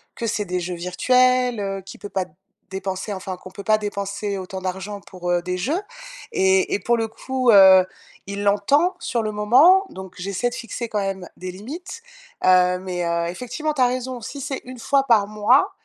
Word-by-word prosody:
que 230 - -3
c'est 210 -1 -1
des 180 -1 -2
jeux 180 0 -4
virtuels, 250 +7 +2
heu, 195 -1 -3
qu'il 190 - -11
peut 205 - -7
pas 190 -2 -1 0.5
dépenser 190 +1 -4
enfin 190 -1 -5
qu'on 185 +1 -12
peut 195 +2 -10
pas 215 +1 +3
dépenser 200 0 -3
autant 190 0 -6
d'argent 190 +2 -5
pour, 180 -2 -5
heu, 175 0 +2
des 180 0 -3
jeux. 285 - -1 0.5
Et 190 0 +3
et - - -1
pour 235 +4 +1
le 225 -1 -1
coup, 255 +3 -2
heu, 190 -2 +8 0.4
il 200 +1 -4
l'entend 275 - +3
sur 235 -8 -2
le 215 - -2
moment. 265 - +5
Donc 190 -1 -9
j'essaie 200 +6 -2
de - - -6
fixer 235 +1 -5
quand 210 - -1
même 195 -2 -3
des 185 - -7
limites. 310 - -8 0.4
Heu, 180 0 +5
mais 180 -1 -4
heu, 170 0 0
effectivement, 250 - -3
tu 275 - -1
as 250 - +6
raison. 255 0 -3
Si 280 +5 -7
c'est 275 0 -4
1 255 0 -9
fois 275 +4 +2
par 220 -5 +5
mois, 215 - +3
205 Hz, 200 wpm, -22 LUFS, 190-250 Hz, 0.5 s, heu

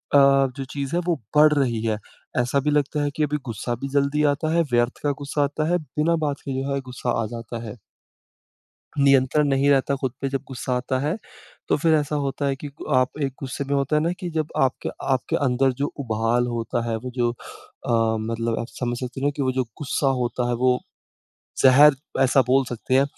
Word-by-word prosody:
जो 135 -1 +4
चीज़ 140 +2 -3
है 175 - +2
वो 175 - +3 0.2
बढ़ 150 0 +7
रही 125 -6 +1
है। 110 -2 0 0.4
ऐसा 125 +3 +1
भी 150 +2 0
लगता 145 0 +1
है 145 - +1
कि 155 - +1
अभी 150 0 0
गुस्सा 120 +1 -3
भी - - -1
जल्दी 140 +2 +1
आता 155 +2 -2
है 170 - +4
व्यर्थ 120 +1 +1
का 145 - +2
गुस्सा 145 +1 0
आता 145 +2 -1
है 175 - +3
बिना 155 +1 0
बात 145 -1 -2
के 135 - -3
जो 140 +1 -2
है 140 - 0
गुस्सा 125 -1 -3
आ - - -1
जाता 115 0 -6
है। 110 -2 -7 1.2
नियंत्रण 140 +1 +4
नहीं 140 +1 +3
रहता 140 0 +3
ख़ुद 130 -3 -1
पे 135 - -1
जब 135 0 -3
गुस्सा 130 -1 -3
आता 130 +1 -1
है 150 +6 -1 0.5
तो - - +3
फ़िर 160 +2 +3
ऐसा 150 -1 +1
होता 140 +1 -2
है 135 -1 0
कि 145 - -7
गु - - -7
आप 130 +3 +1
एक 135 -1 -1
गुस्से 135 +1 -4
में 140 +1 -2
होता 140 +2 +1
हैं 150 - +2
ना 170 +2 +1
कि 180 -2 -4
जब 155 -2 -1 0.2
आपके 130 - -2 0.3
आपके 130 - -1
अंदर 130 +1 +2
जो 145 - +2
उबाल 115 0 +1
होता 120 0 -2
है 115 - 0
वो 125 +3 -6
जो 120 -1 +2
अ, 115 -1 -2
मतलब 115 +1 -2
आप 115 - -4
समझ 120 +1 -3
सकते 125 0 -5
हो 140 - +1
ना - - +3
कि 145 - -1
वो 130 -1 +1
जो 130 0 +1 0.2
गुस्सा 145 0 -1 0.2
होता 120 0 -1
है 120 - +1
वो 125 -1 +4 0.9
ज़हर 140 +2 +8 0.3
ऐसा 135 +1 +5
बोल 135 +1 +4
सकते 120 +1 -4
हैं। 135 - +6
135 Hz, 220 wpm, -23 LUFS, 125-145 Hz, 1.2 s, ज़हर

